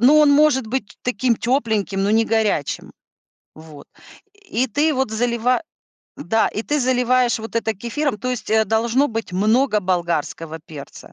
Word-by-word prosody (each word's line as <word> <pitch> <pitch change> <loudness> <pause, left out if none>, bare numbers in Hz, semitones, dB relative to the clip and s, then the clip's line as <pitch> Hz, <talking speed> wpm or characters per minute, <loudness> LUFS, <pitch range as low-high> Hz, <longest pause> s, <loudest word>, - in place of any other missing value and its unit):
Ну 275 +6 +6
он 300 -1 +6
может 285 -4 +4
быть 240 -2 -4
таким 250 0 0
тепленьким, 220 -6 0
но 200 - +1
не 225 +1 +3
горячим. 220 -10 -1 0.6
Вот. 155 -2 -13 0.7
И 255 +3 +2
ты 295 +7 +1
вот 265 -4 -1
залива 235 +3 0 0.6
да, 220 +5 +1
и 215 - -4
ты 295 +2 -1
заливаешь 250 -1 +2
вот 225 +1 -6
это 225 -1 -1
кефиром. 240 +5 -2
То 250 +5 -3
есть, 250 -4 -5
э, 220 0 +4
должно 230 +6 +1
быть 225 -6 -5
много 215 +4 +2
болгарского 170 -3 -2
перца. 145 -3 -11
225 Hz, 155 wpm, -20 LUFS, 205-255 Hz, 0.7 s, Ну